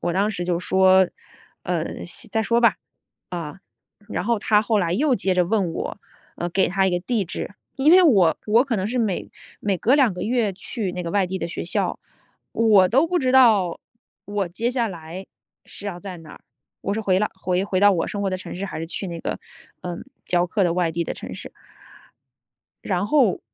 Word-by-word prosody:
我 175 - -1
当 200 +4 +1
时 175 -4 -4
就 175 -1 0
说： 190 0 +4 0.6
“呃， - - -3
先 - - -7
再 220 - +1
说 235 +2 +2
吧。” 235 - +5 1.3
啊， - - -28
然 - - -2
后 235 +1 +1
她 210 0 +3
后 215 0 +1
来 170 -3 0
又 265 +7 +2
接 190 -2 0
着 180 - +3
问 195 -4 0
我， - - -5 0.4
呃， 175 - -3
给 190 +2 +2
她 195 +1 +1
一 190 - +2
个 175 - 0
地 215 +2 -1
址， 180 +3 -6 0.2
因 280 +3 +4
为 370 +1 +8
我 195 - +5
我 225 +3 +5
可 245 -5 -1
能 190 -1 -1
是 245 +4 -2
每 215 -6 -1 0.3
每 195 -3 0
隔 250 - +3
2 270 -7 +4
个 180 - -7
月 225 -3 0
去 195 +1 -4
那 180 0 -4
个 170 - -4
外 195 0 +2
地 190 +1 -4
的 - - -3
学 170 - -5
校， - - -1 0.5
我 215 -5 +5
都 270 - +3
不 355 +1 0
知 255 -4 +1
道， 220 -9 +5 0.5
我 205 -2 -1
接 220 +7 -2
下 245 -2 0
来 170 0 -8 0.4
是 205 - -10
要 185 -4 -4
在 185 -1 -8
哪 160 -2 -13
儿。 - - -14 0.4
我 200 - -1
是 215 - -1
回 190 -3 +2
来 210 - +2
回 185 0 -1
回 185 -2 -1
到 205 0 +6
我 170 -3 0
生 205 - -4
活 200 - 0
的 185 - -1
城 185 - -8
市， 195 +2 -4
还 195 - -6
是 165 - -3
去 185 +4 -5
那 170 -2 -5
个， - - -4 0.4
呃， 175 -1 -5 0.3
教 175 0 +2
课 200 +3 0
的 175 -2 +2
外 175 -2 0
地 170 +1 -1
的 - - -4
城 - - -7
市。 - - -9 1.3
然 185 0 0
后 255 -7 +3
195 Hz, 230 characters per minute, -23 LUFS, 180-220 Hz, 1.3 s, 为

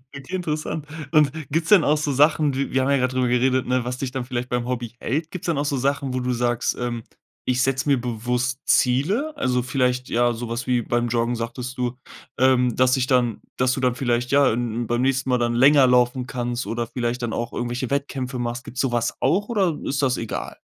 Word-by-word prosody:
Okay, 140 +7 -6
interessant. 155 -3 -3 0.3
Und 150 -4 +4 0.2
gibt's 160 +1 0
denn 195 -7 +7
auch 150 +1 +3
so 150 -1 -1
Sachen 150 +1 +3
wir 140 0 -2
wir 130 - +2
haben 135 - 0
ja 140 - +4
grad 130 0 0
drüber 130 -1 +1
geredet, 125 +1 +2
ne, 125 -1 0
was 125 0 -3
dich 130 -2 -3
dann 130 -1 -4
vielleicht 125 -1 -4
beim 120 -1 -1
Hobby 120 -2 -3
hält? 155 +5 -2
Gibt's 185 - -7
denn 165 -4 0
auch 145 - 0
so 140 -1 0
Sachen, 140 0 -1
wo - - 0
du 125 0 -1
sagst, 120 0 0
ähm: 120 -2 -3 0.4
„Ich 125 0 +1
setze 135 +1 0
mir 140 -3 +3
bewusst 125 +2 -2
Ziele?” 190 - +2
Also, 125 0 +1
vielleicht, 125 -1 0
ja, 120 0 +2
so 115 0 -6
was 115 +1 -3
wie 125 -1 +1
beim 120 +1 -1
Joggen 120 +1 0
sagtest 120 +2 -5
du, 125 0 -2 0.4
ähm, 125 -2 +3
dass 130 0 +4
sich 130 -1 +1
dann 125 -4 +1 0.2
dass 125 0 +2
du 130 - -3
dann 125 -2 +2
vielleicht, 120 -1 -1
ja, 140 -3 +5
n 120 -1 -2
n 115 - -3
beim 120 +1 0
nächsten 135 0 0
Mal 125 - +3
dann 120 0 0
länger 135 +2 +6
laufen 125 0 +3
kannst 120 -1 -3
oder 115 0 -3
vielleicht 120 0 -3
dann 115 -2 -2
auch 120 0 -3
irgendwelche 120 +1 -3
Wettkämpfe 135 -2 -2
machst. 120 +1 -3
Gibt's 125 - -8
so 135 -3 0
was 120 0 0
auch 205 +3 +2
oder 190 -9 +1
ist 140 +1 -1
das 130 -2 +1
egal? 115 - -5
125 Hz, 230 wpm, -23 LUFS, 120-140 Hz, 0.4 s, denn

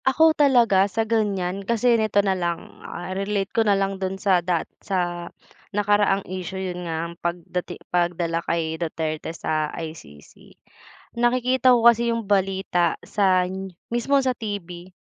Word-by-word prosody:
Ako 315 +4 +5
talaga, 235 -10 +4
sa 225 +3 -1
ganyan, 200 -4 0
kasi 235 +4 +2
nito 215 -3 +2
na 195 - +2
lang, 175 -2 -4
ah, 175 +2 -6
relate 195 0 -2
ko 230 - +3
na 205 -3 +3
lang 195 0 -2
do'n 190 0 -2
sa 190 -2 +2
dat 175 -1 0 0.2
sa 175 -2 -2 0.5
nakaraang 205 -1 +2
issue. 185 0 -5
'Yon 180 -2 -4
nga, 165 0 -2
ang 170 - -7
pagdati 175 +1 -4 0.2
pagdala 170 -1 0
kay 160 -1 -2
Duterte 155 -2 -3
sa 155 -1 -2
ICC. 155 - -10 0.6
Nakikita 255 +1 +4
ko 230 - 0
kasi 235 0 +5
'yong 230 -1 -1
balita 190 -3 +1
san 190 -1 +1 0.2
mismo 240 +4 +2
sa 255 - +2
TV 185 -5 -6
190 Hz, 150 wpm, -23 LUFS, 175-215 Hz, 0.6 s, Ako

